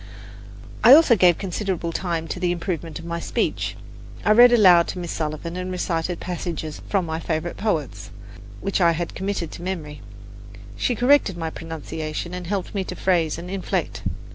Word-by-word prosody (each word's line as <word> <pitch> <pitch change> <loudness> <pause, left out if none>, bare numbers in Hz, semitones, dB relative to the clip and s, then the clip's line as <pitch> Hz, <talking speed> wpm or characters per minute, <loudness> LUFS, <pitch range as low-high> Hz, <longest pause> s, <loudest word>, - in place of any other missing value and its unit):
I 245 +5 +10
also 305 -6 +6
gave 180 -4 +5
considerable 185 -3 -3
time 165 -2 -2
to - - -4
the 180 -1 +1
improvement 170 -3 -4
of 165 - -9
my 170 0 -3
speech. - - -2 0.5
I 215 - +4
read 240 +3 +8
aloud 185 -7 +6
to - - -5
Miss 175 -2 -4
Sullivan 155 +2 -4
and 185 0 -4
recited 175 -1 -2
passages 170 -3 -5
from 195 -3 +1
my 160 0 -3
favourite 165 +1 -3
poets, 150 - -2 0.5
which 195 0 -1
I 170 -1 +5
had 170 +1 -4
committed 190 -4 -3
to - - -9
memory; 155 -7 -5 0.7
she 245 - 0
corrected 245 -6 +3
my 165 -1 -3
pronunciation 160 +1 -6
and 180 -1 -6
helped 195 -1 -3
me 195 -2 -1
to 180 - -6
phrase 170 -5 +1
and 170 +1 -7
inflect. 190 0 -3
175 Hz, 170 wpm, -23 LUFS, 165-190 Hz, 0.7 s, I